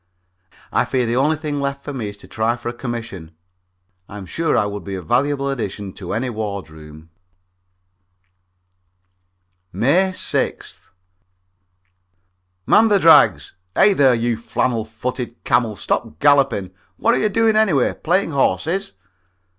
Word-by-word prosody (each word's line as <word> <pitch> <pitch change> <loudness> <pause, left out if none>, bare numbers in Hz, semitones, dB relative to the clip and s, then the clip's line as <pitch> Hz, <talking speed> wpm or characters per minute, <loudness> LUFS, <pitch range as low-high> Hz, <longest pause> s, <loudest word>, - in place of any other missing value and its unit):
I - - +2
fear 125 -2 -1
the 115 +1 -1
only 145 +5 +2
thing 150 -2 -4
left 140 0 -3
for 145 - -6
me 115 -6 -4
is 100 - -10
to - - -15
try 110 +2 -1
for 120 0 -6
a - - -5
commission. 115 -10 -7 0.7
I'm 100 -1 -8
sure 165 - -1
I - - +2
would 105 0 -5
be 100 - -5
a 95 - -5
valuable 140 - 0
addition 100 -6 -5
to 90 -3 -7
any 115 +5 -1
wardroom. 80 -8 -7 2.6
May 140 - +2
6th. 185 - -3 1.8
"Man 225 +1 +5
the 205 -2 +4
drags! 165 -4 +5 0.2
Hey, 205 - +5
there, 135 -7 +4
you 115 0 -1
flannel 115 0 -1
footed 120 +2 -6
camel, 120 -3 +1
stop 75 - -3
galloping! 135 - +2 0.3
What 230 - +2
are - - +1
you 215 - +1
doing, 225 +1 +2
anyway 195 - +2
playing 175 +1 0
horses?" 160 - 0
120 Hz, 140 wpm, -20 LUFS, 105-145 Hz, 2.6 s, Man